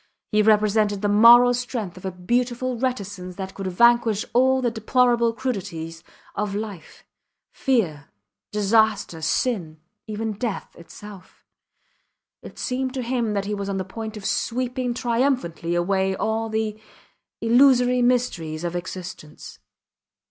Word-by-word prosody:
He 215 -1 +4
represented 210 -1 +2
the - - +2
moral 235 +4 +7
strength 240 -7 -4
of 185 - -11
a 190 - -2
beautiful 240 +7 -1
reticence 200 -7 -4
that 190 0 -6
could 195 -1 -5
vanquish 230 +2 +3
all 260 +2 +4
the 245 -2 0
deplorable 235 +1 +2
crudities 185 -9 -5 0.3
of 205 -1 -3
life 205 -6 -7 0.5
fear, 180 - -1 0.4
disaster, 210 -4 +1
sin 160 -2 -1 0.3
even 215 0 -3
death 215 0 -5
itself. 190 +3 -13 1.0
It - - -12
seemed 260 +1 -2
to 255 - -2
him 235 -3 -1
he 205 +1 -3
was 200 -1 -4
on 195 - -2
the 190 - -3
point 220 +2 -7
of 200 - -9
sweeping 250 +2 -1
triumphantly 235 - -1
away 190 +2 +1
all 225 +2 -1
the 220 -1 -2 0.6
illusory 250 +1 +4
mysteries 235 -11 0
of 175 0 -3
existence. 175 -3 -8
215 Hz, 125 wpm, -23 LUFS, 190-245 Hz, 1.0 s, moral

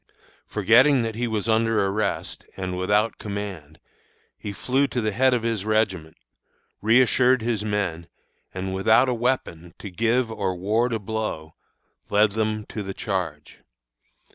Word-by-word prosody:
Forgetting 120 +6 +4
that 115 -1 -3
he 120 +2 -2
was 110 -1 -2
under 115 -2 +2
arrest, 100 +1 -2
and 95 -1 -3
without 105 +4 +1
command, 100 -7 -6 0.6
he 105 - -7
flew 130 +7 0
to 125 - -3
the 110 -2 0
head 130 +5 +3
of 120 - -2
his 115 -4 -1
regiment, 100 -7 -1 0.6
reassured 125 +2 +4
his 115 -3 -1
men, 100 -6 -2 0.4
and, 95 0 -4
without 110 +7 +4
a - - +1
weapon 115 -9 -2
to 100 - -8
give 115 +4 +1
or 95 -4 -2
ward 110 +7 0
a 115 - 0
blow, 105 -7 -4 0.6
led 105 0 +3
them 110 0 -2
to 110 - -5
the 95 -1 -6
charge. 90 -10 -4
110 Hz, 145 wpm, -24 LUFS, 95-115 Hz, 0.6 s, Forgetting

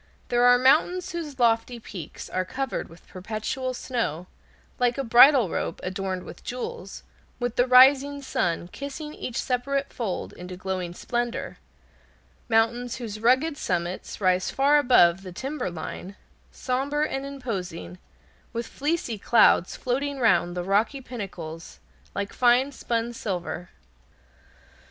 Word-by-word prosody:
There 240 0 +3
are 245 0 +7
mountains 345 +8 +3
whose 315 -5 -5
lofty 235 0 +2
peaks 180 -8 -8
are 185 - -1
covered 260 +7 -4
with 165 +2 -16
perpetual 220 +7 -4
snow, 225 - -3 0.5
like 245 0 +2
a 275 - -1
bridal 245 0 +7
robe - - -3
adorned 185 0 -3
with - - -11
jewels, 240 -6 -6 0.4
with 245 -2 -2
the 245 - +3
rising 275 +3 +6
sun 175 -9 -1
kissing 285 - -7
each 250 - -6
separate 275 +2 -1
fold 220 -8 -4
into 180 0 -9
glowing 185 -2 -4
splendor; 240 +4 -3 0.9
mountains 235 +2 +2
whose 220 -4 -6
rugged 260 +7 +3
summits 175 -3 -3
rise 185 -2 +2
far 285 +2 +4
above 190 -10 +5
the 185 -1 -9
timber 265 +4 -4
line, 175 +3 -7 0.4
somber 275 +4 -1
and 270 -3 -2
imposing, 200 -11 -6 0.5
with 235 0 -3
fleecy 285 -7 -2
clouds 215 -5 +4
floating 275 +3 -2
round 180 -7 +2
the 175 - -1
rocky 205 +9 +1
pinnacles 180 -10 -8 0.4
like 200 0 -3
fine 250 +3 +3
spun 235 -3 -2
silver. 180 -5 -4
240 Hz, 130 wpm, -25 LUFS, 185-265 Hz, 0.9 s, are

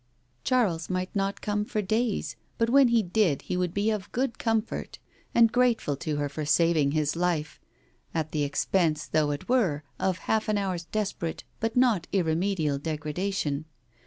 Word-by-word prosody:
Charles 200 -11 +1
might 185 +1 -2
not 195 0 -1
come 210 0 0
for 210 0 -2
days, 220 +2 -1 0.2
but 230 0 +1
when 275 0 +7
he 235 -2 +3
did 180 -6 +1
he - - -3
would 180 -1 0
be 205 +4 +1
of 205 -2 -4
good 255 0 -1
comfort, 225 -1 -1 0.4
and 230 -1 +6
grateful 240 - +2
to 150 +2 -3
her 145 0 -1
for 150 +2 -5
saving 155 -1 +3
his 155 -1 +1
life 170 -3 -1 0.5
at 160 -1 -2
the 150 - -1
expense 155 +2 +1
though 155 -1 +1
it 145 0 -4
were 190 - +2 0.2
of 185 -2 +1
half 220 -1 +1
an 210 - +2
hour's 185 -4 -2
desperate 195 -4 -3 0.2
but 225 0 -1
not 235 -9 +3
irremediable 165 -4 +1
degradation. 155 0 -2
185 Hz, 165 wpm, -27 LUFS, 155-215 Hz, 0.5 s, when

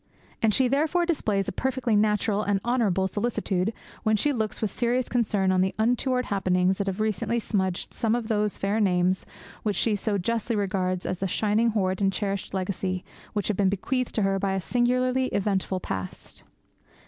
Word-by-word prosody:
And 225 - +4
she 260 +4 +3
therefore 310 +6 +2
displays 215 - 0
a - - -1
perfectly 255 0 0
natural 210 0 +2
and 205 -2 +1
honourable 215 -6 +2
solicitude 205 -2 -1 0.3
when 215 -1 +2
she 290 +7 +2
looks 220 -4 -2
with 215 -3 -1
serious 245 +2 0
concern 210 -6 +1
on 185 0 +3
the 190 0 0
untoward 245 +3 +1
happenings 185 -1 +1
that 200 - -1
have 195 0 -2
recently 215 +2 0
smudged 190 -5 -1
some 230 -1 +1
of 240 -2 -3
those 210 -2 0
fair 200 +3 0
names 185 -2 +2 0.3
which 210 -2 -1
she 215 +3 +2
so 205 +1 -1
justly 230 +4 -1
regards 185 -3 -1
as 185 - -2
the 195 - 0
shining 215 +5 +2
hoard 190 -3 0
and 195 -1 +3
cherished 195 0 -3
legacy 185 -1 -2 0.3
which 205 -2 -1
have 210 - 0
been 195 -2 +3
bequeathed 250 +6 -2
to 215 - +2
her 195 0 +1
by 195 0 0
a 190 - 0
singularly 250 +4 +1
eventful 195 -3 0
past. 95 - -6
205 Hz, 185 wpm, -26 LUFS, 190-235 Hz, 0.3 s, And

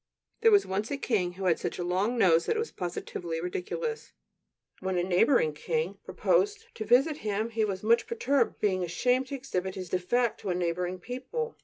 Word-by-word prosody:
There 455 - +6
was 410 -2 +5
once 200 +4 -2
a 285 - -2
king 195 -10 0
who 190 +1 -5
had 175 -3 +3
such - - -3
a 175 - -2
long 190 +7 0
nose 170 -6 +4
that - - +2
it - - -1
was 460 - -3
positively 175 -1 -4
ridiculous. 445 - -4 0.7
When 190 -1 -2
a 175 - +1
neighboring 180 - +3
king 470 - -2
proposed 450 0 0
to 215 - -5
visit 270 +7 +4
him, 215 -1 -2
he 225 -1 0
was 195 -2 -4
much 230 +2 +3
perturbed, 445 - +1
being 185 -3 +1
ashamed 250 +9 +1
to 280 - -4
exhibit 190 -9 -3
his 185 -2 -6
defect 215 +7 0
to 195 - -5
a 180 - +1
neighboring 180 +1 -1
people. 260 - -5
210 Hz, 195 wpm, -29 LUFS, 180-275 Hz, 0.7 s, There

